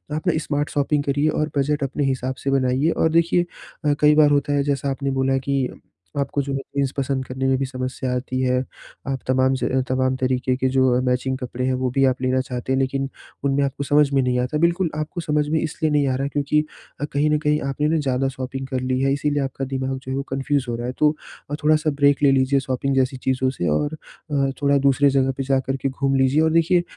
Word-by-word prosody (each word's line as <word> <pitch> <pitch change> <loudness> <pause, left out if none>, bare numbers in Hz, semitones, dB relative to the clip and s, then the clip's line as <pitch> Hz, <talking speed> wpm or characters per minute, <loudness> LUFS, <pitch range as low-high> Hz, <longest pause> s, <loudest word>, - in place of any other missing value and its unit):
आप 155 - -4
ना 175 - +4
smart 145 0 -1
shopping 145 0 0
करिए 145 +2 +1
और 155 0 -1
बजट 145 +1 +1
अपने 140 +2 -2
हिसाब 130 -1 -1
से 135 - 0
बनाइए। 135 +3 +2
और 160 - +1
देखिए 170 +1 +3 0.4
अ, 145 - +4
कई 150 0 +6
बार 150 -1 +6
होता 145 0 +1
है 140 -1 +2
जैसा 140 0 -1
आपने 135 0 -2
बोला 135 0 +2
कि 135 -2 +1 0.5
आपको 140 +1 -1
जो 140 0 -4
है 135 - -1 0.2
जीन्स 140 -2 +1
पसंद 135 -1 -1
करने 130 +1 -2
में 130 - +3
भी 135 - -1
समस्या 130 0 -4
आती 130 +1 -3
है, 125 -1 +2 0.5
आप 135 -1 -2
तमाम 130 0 +3
ज 130 0 0
तमाम 130 0 +1
तरीके 130 0 0
के 130 - +1
जो 130 -1 +3
मैचिंग 130 +1 0
कपड़े 125 -1 -4
हैं, 130 - +1
वो 130 0 -1
भी 135 +1 +2
आप 130 -1 +1
लेना 130 0 +1
चाहते 125 0 -5
हैं, 130 - +1
लेकिन 135 +1 -1 0.3
उनमें 140 0 +2
आपको 140 0 -2
समझ 145 0 +3
में 135 - +4
नहीं 125 -1 0
आता 125 +4 -1
है। 150 - -2
बिल्कुल 170 +1 +2
आपको 155 +3 -4
समझ 150 -1 0
में 160 0 +1
इसलिए 155 0 -1
नहीं 145 -1 +2
आ 130 - +1
रहा 135 +2 -1
क्योंकि 145 +1 +1 0.4
अ, - - +1
कहीं 145 +2 +2
न 150 - +3
कहीं 150 0 +3
आपने 150 +2 0
ना 160 +1 +2
ज़्यादा 135 -1 0
शॉपिंग 135 0 -5
कर 130 -1 -2
ली 130 0 -1
है, 135 0 +2
इसीलिए 145 0 0
आपका 135 0 -4
दिमाग 130 0 -3
जो 130 0 -8
है, - - -1
वो 140 - -2
कन्फ्यूज़ 135 0 0
हो 120 - -1
रहा 120 +1 -4
है। 125 - -3
तो 150 - +5 0.4
अ, - - 0
थोड़ा-सा 155 +1 +3
ब्रेक 140 0 +4
ले 140 - +6
लीजिए 135 +1 +3
शॉपिंग 130 +1 -2
जैसी 130 0 +1
चीज़ों 130 0 +1
से 90 -10 -3
और 145 - 0
अ, 140 -3 -3
थोड़ा 140 0 +3
दूसरे 140 +1 +4
जगह 135 -1 +2
पे 135 - -1
जाकर 135 0 0
के 135 - +2
घूम 135 +1 -1
लीजिए 135 +3 +3
और 160 0 +3
देखिए 170 +2 +3
135 Hz, 245 wpm, -22 LUFS, 130-145 Hz, 0.5 s, कई